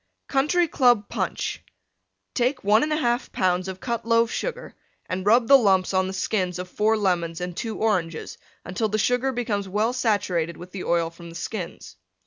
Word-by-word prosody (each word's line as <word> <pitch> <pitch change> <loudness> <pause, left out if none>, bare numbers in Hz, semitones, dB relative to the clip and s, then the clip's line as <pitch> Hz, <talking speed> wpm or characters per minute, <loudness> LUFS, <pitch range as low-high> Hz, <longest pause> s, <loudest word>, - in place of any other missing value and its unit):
COUNTRY 305 +6 +2
CLUB 245 -8 +3
PUNCH - - -3 0.7
Take 255 +2 0
1 215 +9 +4
1/2 305 0 0 0.3
lbs. 185 0 0
of 190 0 -6
Cut 235 +1 -3
Loaf 230 0 +3
Sugar - - -4 0.3
and 185 +2 -4
rub 230 +2 +5
the 275 -1 +8
lumps 195 -4 +2
on 185 0 +2
the 190 - -4
skins 185 -2 -1
of 180 0 -5
4 215 +4 +1
Lemons 175 -5 0
and 180 -1 -4
2 225 +3 -4
Oranges 180 -7 -1 0.3
until 185 +5 -1
the 215 - 0
Sugar 245 +5 +1
becomes 215 -6 -2
well 215 +5 +1
saturated 185 -9 0
with 180 +1 -11
the 190 - -6
oil 165 -1 +1
from 170 0 -12
the 165 - -11
skins. 185 -1 -6
205 Hz, 175 wpm, -24 LUFS, 180-235 Hz, 0.7 s, the